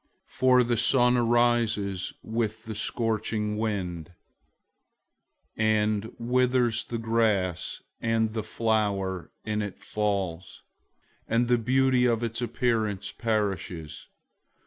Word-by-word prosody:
001:011 - - -19
For 130 -1 +5
the 120 -1 0
sun 125 +1 +4
arises 120 -5 +1
with 110 -1 -2
the 110 - -5
scorching 110 -1 -1
wind, 90 -7 -3 1.4
and 110 0 +1
withers 125 0 +1
the 120 - -4
grass, 110 -6 0 0.2
and 110 -1 +1
the 110 - -1
flower 105 -5 -1
in 105 0 -1
it 105 -2 -5
falls, 100 -5 -3 0.6
and 120 +1 +2
the 120 0 +3
beauty 130 +1 +3
of 115 -1 +1
its 115 +1 -2
appearance 110 -5 -1
perishes. 95 -8 -3
110 Hz, 105 wpm, -27 LUFS, 105-120 Hz, 1.4 s, For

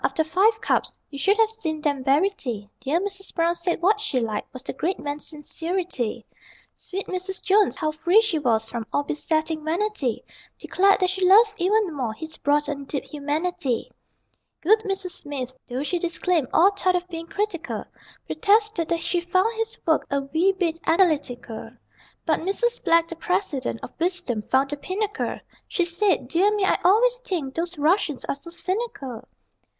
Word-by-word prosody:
After 320 - +1
five 405 +7 +3
cups - - 0
(You 280 - -6
should 400 +7 +3
have 445 -1 +4
seen 320 -9 -3
them 285 -3 0
bury 290 +9 +3
tea) 235 - -5
Dear 280 +6 +1
Mrs. 390 0 -5
Brown 335 0 +2
said 345 0 -2
what 420 +3 +4
she 350 -12 0
liked 220 -3 -3
Was 255 0 -9
the - - -5
great 345 +8 -1
man's 290 0 -5
sincerity. 305 - -3 0.5
Sweet 390 +2 -5
Mrs. 370 +1 -4
Jones 405 +1 +3
(how 310 -2 0
free 345 +6 +4
she 435 -8 +1
was 225 -5 +1
From 225 -1 -5
all 285 - +1
besetting 310 +1 -1
vanity) 330 - -1 0.3
Declared 395 +2 +3
that 370 0 +3
she 380 0 -2
loved 420 +4 +7
even 385 0 +2
more 245 -6 -2
His 315 +4 -7
broad 295 +1 +2
and 280 -2 -4
deep 280 - -2
humanity. 300 -2 -2 0.7
Good 430 +6 +5
Mrs. 390 -3 -3
Smith, 270 -6 -5
though 255 +2 -3
she 350 +4 -1
disclaimed 345 -3 0
All 380 +4 +6
thought 370 -2 +1
of 360 0 -1
being 330 -2 -6
critical, 355 -4 -3 0.4
Protested 425 -5 +2
that 335 -1 0
she 350 0 0
found 370 +6 +1
his 450 +1 -2
work 320 -2 +2
A 280 0 0
wee 320 +8 +2
bit 345 -4 -1
analytical. 285 - +1 0.6
But 315 -2 +2
Mrs. 475 +7 -1
Black, 335 0 +4
the 335 - -6
President, 255 - -1
Of - - -7
wisdom 345 - 0
found 270 +2 +3
the 290 - -3
pinnacle: 400 +7 -2 0.3
She 355 - +1
said, 345 -6 +1
"Dear 350 +9 +3
me, 405 -2 +2
I - - +2
always 475 +7 +4
think 345 - -3
Those 340 0 -3
Russians 305 -1 +1
are - - -1
so 280 +5 -9
cynical." 340 - -3
335 Hz, 175 wpm, -24 LUFS, 285-390 Hz, 0.7 s, loved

